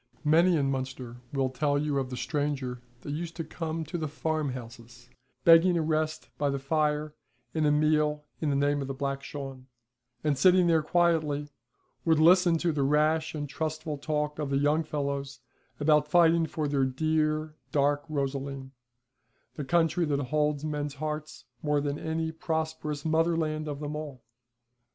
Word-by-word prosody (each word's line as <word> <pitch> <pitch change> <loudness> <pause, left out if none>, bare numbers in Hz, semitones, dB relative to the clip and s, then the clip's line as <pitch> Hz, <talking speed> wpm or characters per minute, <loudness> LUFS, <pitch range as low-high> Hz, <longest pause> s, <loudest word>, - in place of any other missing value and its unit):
Many 165 +3 +5
in 135 -2 +1
Munster 130 -2 -5
will 135 -2 0
tell 145 +2 +1
you 145 -1 0
of 130 -1 -3
the 125 - -5
stranger 140 -5 -2 0.2
that 145 - -6
used 165 +3 -4
to 165 - -3
come 160 0 -4
to 170 +3 -4
the 155 - -2
farmhouses 125 -6 -5 0.3
begging 170 +1 +6
a 165 - +1
rest 155 0 -1
by 145 - +2
the 140 - -1
fire 150 +1 0 0.4
and 155 -2 +1
a - - +4
meal 150 0 +2 0.2
in 155 - 0
the 140 - +1
name 145 +1 +1
of 135 -1 -4
Black 140 0 -2
Shawn, 135 -2 -7 0.6
and 150 -2 +2
sitting 180 +3 +6
there 165 -2 +4
quietly 155 -3 +1 0.5
would 160 -2 +3
listen 175 +1 +5
to 170 +1 +1
the 145 -2 -1
rash 155 +3 +2
and 145 -1 -3
trustful 155 +1 -3
talk 150 0 -2
of 150 -2 -2
the 135 - +1
young 145 +3 +2
fellows 140 -3 -3 0.4
about 150 0 +3
fighting 165 0 +4
for 155 -1 -2
their 140 -1 +1
dear 155 +2 0 0.2
Dark 145 0 +2
Rosaleen, 135 -2 -3 0.8
the 150 - -5
country 165 +3 +2
that 145 -2 0
holds 150 +2 0
men's 145 -2 -3
hearts 150 -2 -5 0.2
more 150 -1 +1
than 145 0 -2
any 160 0 -2
prosperous 160 -2 -3
mother 165 +1 +2
land 155 -1 -2
of 145 -1 -4
them 150 0 -4
all. 145 -5 -7
150 Hz, 165 wpm, -28 LUFS, 140-160 Hz, 0.8 s, begging